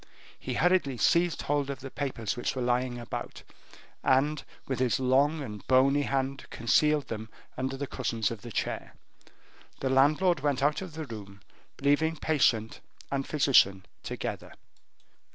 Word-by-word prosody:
He - - -4
hurriedly 175 -7 +2
seized 170 +8 +2
hold 145 -1 0
of 135 -1 -5
the 135 0 -8
papers 135 -3 -3
which 120 - -2
were 130 - -2
lying 125 0 0
about, 120 -1 -6 0.6
and 140 +3 +2 0.2
with 130 -2 -2
his 125 -4 +1
long 140 +4 +2
and 105 -5 -8
bony 135 +2 +4
hand 135 -1 -2
concealed 150 +5 +2
them 110 0 -5 0.3
under 130 +1 -3
the 140 - -3
cushions 115 -5 -2
of 115 -3 -6
the 120 - -9
chair. - - -3 0.8
The 130 - -1
landlord 150 +6 +4
went 140 -1 0
out 150 +4 +2
of 185 -4 -7
the 160 -1 -4
room, 100 -5 -10 0.4
leaving 145 +3 +2
patient 120 -9 +1 0.3
and 135 -1 -1
physician 110 -10 +4 0.2
together. - - -5
135 Hz, 150 wpm, -29 LUFS, 120-145 Hz, 0.8 s, bony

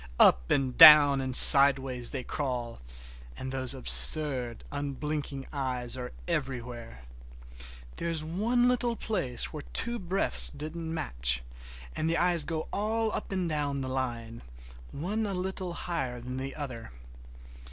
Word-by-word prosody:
Up - - +2
and 130 -3 -2
down 145 -3 +6
and 130 -1 -3
sideways 135 -3 +9
they 130 - -7
crawl, 125 - -7 0.6
and 130 - -9
those 130 -1 -3
absurd, 120 - +2
unblinking 145 -1 -7
eyes 130 -3 -3
are 125 -1 -9 0.2
everywhere. 125 - -7 0.9
There 170 - -6
is 160 -2 -2
one 235 +9 -2 0.2
place 145 - -5
where 155 - -8
two 235 -1 -3
breadths 190 +2 0
didn't 160 +3 -9
match, 60 - -3 0.5
and 160 - -4
the 165 - -2
eyes 175 -1 -1
go 160 +1 -7
all 220 +2 -3
up - - -7
and 185 -2 -4
down 145 -3 -5
the 130 - -7
line, 120 -3 -7 0.5
one 210 +9 -6
a 195 - -6
little 185 -1 -6
higher 135 -9 -7
than 125 +2 -10
the 135 +1 -8
other. 130 - -10
140 Hz, 135 wpm, -26 LUFS, 125-170 Hz, 0.9 s, sideways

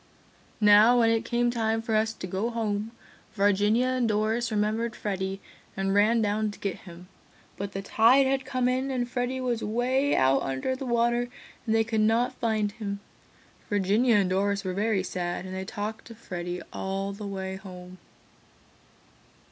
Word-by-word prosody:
"Now 210 +3 +7
when 230 -1 +4
it 225 -1 +1
came 240 0 +1
time 225 -1 0
for 225 -1 -2
us 220 +1 +2
to 220 - -8
go 190 +5 -2
home, 220 -2 -2 0.5
Virginia 205 +4 +3
and 255 -2 +1
Doris 220 +2 0
remembered 215 +1 -1
Freddy 195 -1 -3 0.4
and 195 0 0
ran 220 +3 +4
down 210 +1 0
to 205 - -10
get 195 -3 -2
him, 170 +1 -12 0.5
but 200 0 -5
the 195 - -4
tide 235 +7 +5
had 270 0 0
come 255 -1 -1
in 260 +2 0
and 250 -2 -1
Freddy 245 +1 -2
was 245 -3 -1
'way 255 +6 +1
out 135 +1 +3
under 135 - -2
the 265 0 -6
water 240 0 +1 0.4
and 220 - +2
they 225 - +4
could 220 -1 0
not 225 +3 +2
find 215 -3 -1
him. 200 -2 -5 0.7
Virginia 205 +4 +3
and 195 -3 +2
Doris 200 +1 0
were 185 -1 -3
very 205 0 0
sad 175 -1 -3
and 185 - -7
they 190 0 -4
talked 210 +4 -5
of 230 - -11
Freddy 175 -4 -5
all 195 +1 -3
the 205 +1 -7
way 190 -1 -4
home." 185 -2 -11
215 Hz, 170 wpm, -27 LUFS, 195-235 Hz, 0.7 s, Now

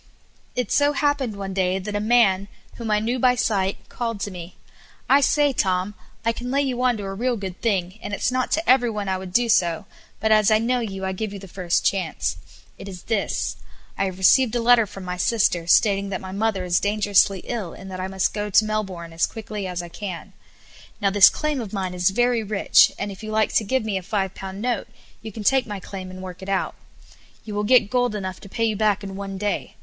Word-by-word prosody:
It 250 -4 -2
so 290 0 +3
happened 285 -6 0
one 195 -1 -5
day 185 -1 +1
that 205 +2 -5
a - - +1
man, 210 -3 +3 0.3
whom 230 -2 -5
I 210 - +3
knew 235 +4 -1
by 250 0 +4
sight, 200 -5 -1
called 230 -3 -4
to 205 - -3
me: 180 -1 -9 0.5
"I 280 +1 +5
say, 290 0 +3
Tom, 185 -2 0 0.3
I 230 - +3
can 245 +2 -6
lay 280 +2 +2
you 255 -3 -2
on 250 -2 +2
to 205 - -6
a 195 0 -4
real 240 +4 -1
good 190 -3 -7
thing, 195 -3 -1
and - - -6
it's 205 - 0
not 255 0 -1
to 325 +2 0
every 250 -1 +5
one 210 -2 -4
I 190 -1 -1
would 185 -1 -8
do 240 +5 +2
so, 175 -3 +2 0.3
but 220 +1 +1
as 215 -2 +5
I 215 - +5
know 245 +3 +1
you 195 -5 -4
I 190 - -1
give 205 +2 -4
you - - -6
the 195 0 -10
first 180 -1 -1
chance. 160 - -1 0.4
It 195 - -9
is 180 -2 -9
this: 215 -3 -1 0.4
I 195 - 0
have 185 -1 -4
received 235 +6 +4
a - - +2
letter 230 -1 +5
from 195 0 -10
my 180 0 -4
sister, 180 -4 +1
stating 200 +1 +3
that 190 - -3
my 190 - -8
mother 200 -1 -1
is 175 -1 +2
dangerously 205 -2 +2
ill, 215 -8 -4
and 190 0 -10
that 185 - -6
I 185 - -2
must 190 -1 -1
go 210 -1 -2
down 205 - -7
to 215 - +6
Melbourne 190 -6 -4
as 165 - +1
quickly 215 -3 -6
as 180 -1 -4
I 175 - -9
can. 185 -1 -7 0.7
Now, 200 -2 +1
this 205 0 +8
claim 305 -4 -2
of 215 -3 -7
mine 190 -3 -2
is 180 +1 +2
very 240 +3 +2
rich, 210 -2 +4
and 200 0 -3
if 190 - -10
you 215 - -6
like 215 0 +1
to - - +3
give 225 +2 0
me 200 -3 -1
a - - -10
five 195 0 -2
pound 195 +2 -7
note 245 -1 -1 0.3
you 220 - -7
can 215 +1 -7
take 265 +3 +3
my 205 -2 -5
claim 185 0 -8
and 185 0 -9
work 185 -1 -8
it 190 - -7
out. 195 -1 0 0.7
You 215 - -6
will 205 0 -1
get 215 -2 +4
gold 245 -3 +1
enough 190 -2 -5
to 200 - -12
pay 230 - -2
you 220 -1 0
back 210 -1 +1
in 195 -1 -6
one 195 0 -5
day. 205 +1 -3
205 Hz, 245 wpm, -23 LUFS, 190-230 Hz, 0.7 s, this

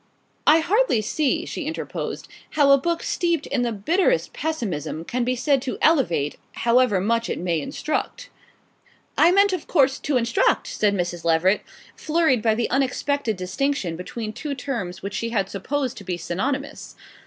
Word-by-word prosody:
"I 320 +2 +7
hardly 415 - +2
see," 310 - 0
she 335 - -5
interposed, 320 - -5 0.3
"how 285 -2 +6
a 275 - +8
book 340 +3 -1
steeped 340 -3 0
in 275 -3 -1
the 240 -1 0
bitterest 350 - +1
pessimism 190 - -3
can 250 +5 -1
be 250 +1 0
said 270 +2 +2
to 260 - -4
elevate 170 - +2
however 235 -4 +3
much 230 +4 0
it - - -2
may 170 -3 -1
instruct." 480 - -4 0.8
"I 340 - +5
meant, 400 +1 +4
of 365 - -4
course, 270 -5 +3
to 280 -3 0
instruct," 235 -1 +2
said 205 -1 0
Mrs. 175 -2 -3
Leveret, 170 +4 +3 0.3
flurried 310 -7 +1
by 220 -1 +2
the 235 +1 0
unexpected 270 -3 0
distinction 185 0 -1
between 215 +5 -6
two 290 +4 -4
terms 235 -11 -5
which 200 0 -4
she 230 - -2
had 205 -4 -1
supposed 260 +6 -2
to - - -9
be 180 -2 -3
synonymous. 265 - -4
250 Hz, 165 wpm, -23 LUFS, 200-300 Hz, 0.8 s, a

